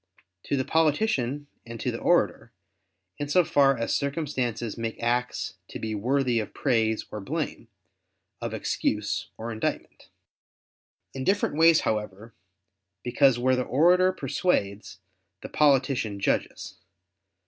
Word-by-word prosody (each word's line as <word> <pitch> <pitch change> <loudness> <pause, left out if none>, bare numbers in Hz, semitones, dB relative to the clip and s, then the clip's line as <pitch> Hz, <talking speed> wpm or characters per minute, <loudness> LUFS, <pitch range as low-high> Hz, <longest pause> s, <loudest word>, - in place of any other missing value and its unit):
To 140 - -1
the 130 - -1
politician 150 - +1 0.2
and 115 -1 -9
to - - -1
the - - -5
orator, - - +1 0.7
in 145 0 -3
so 175 +3 +4
far 135 -3 +3
as 115 - -1
circumstances 130 -6 -2
make 115 -1 -4
acts 125 +1 -1
to - - -7
be 110 -1 -4
worthy 125 +3 +1
of 110 - -6
praise 110 -4 +1
or 105 - -5
blame, 145 0 -4 0.7
of - - -3
excuse - - -2
or 115 +1 -5
indictment. 110 -1 -4 1.0
In 135 - -5
different 195 0 +1
ways, 165 0 +5
however: 105 +1 -3 0.7
because 125 +1 +3
where 130 +1 +2
the 125 - 0
orator 175 +9 +4
persuades, 105 - -2 0.4
the - - -8
politician 130 -7 +2
judges. 100 - -2
130 Hz, 125 wpm, -26 LUFS, 115-145 Hz, 1.0 s, ways